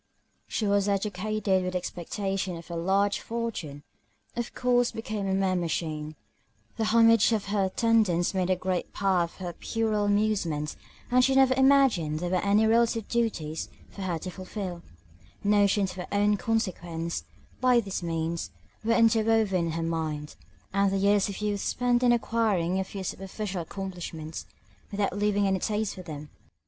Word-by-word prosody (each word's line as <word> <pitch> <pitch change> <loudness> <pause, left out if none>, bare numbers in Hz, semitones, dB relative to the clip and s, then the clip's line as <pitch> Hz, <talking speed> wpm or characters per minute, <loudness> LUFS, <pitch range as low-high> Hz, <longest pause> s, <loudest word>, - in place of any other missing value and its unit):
She 220 - -2
was 200 0 +2
educated 200 0 0
with 185 0 -3
the - - +1
expectation 190 +1 -3
of 165 +1 -11
a - - -3
large 195 +4 +1
fortune, 215 -12 -4 0.5
of 240 0 -3
course 245 -1 +2
became 215 -3 -4
a 190 - +1
mere 190 -1 +1
machine: 155 -3 -2 0.6
the 225 - 0
homage 230 0 +5
of 210 -3 0
her 200 -2 +2
attendants 200 -4 +2
made 185 -1 0
a 185 - +4
great 185 0 -2
part 185 -4 +1
of - - -20
her 180 -2 -5
puerile 215 0 -1
amusements, 205 -8 0 0.4
and 250 +1 +5
she 270 +1 +3
never 265 -1 +5
imagined 265 - +4
there 175 +2 -3
were 185 -1 +1
any 205 +2 +4
relative 230 0 +2
duties 180 -10 -1 0.2
for 200 - -9
her 180 -3 -1
to 180 +3 -6
fulfil: 185 -1 -6 0.6
notions 205 -1 +3
of - - -11
her 180 - -5
own 205 +1 +3
consequence, 175 -7 -2 0.4
by 250 -1 +4
these 195 -5 -3
means, 165 0 -2 0.3
were 230 +1 +2
interwoven 220 -5 +3
in - - -2
her 165 0 -2
mind, 155 -2 -3 0.4
and 200 0 +3
the 195 - +1
years 200 +1 +3
of 200 - -6
youth 205 -1 -1
spent 245 -1 +1
in 245 -1 +5
acquiring 215 -7 +1
a - - +1
few 190 0 -7
superficial 195 0 -4
accomplishments, 170 -3 -6 0.4
without 200 -2 -1
having 205 0 +1
any 190 -1 +1
taste 215 +2 -1
for 185 - -9
them. 150 -4 -8
195 Hz, 165 wpm, -27 LUFS, 175-220 Hz, 0.6 s, homage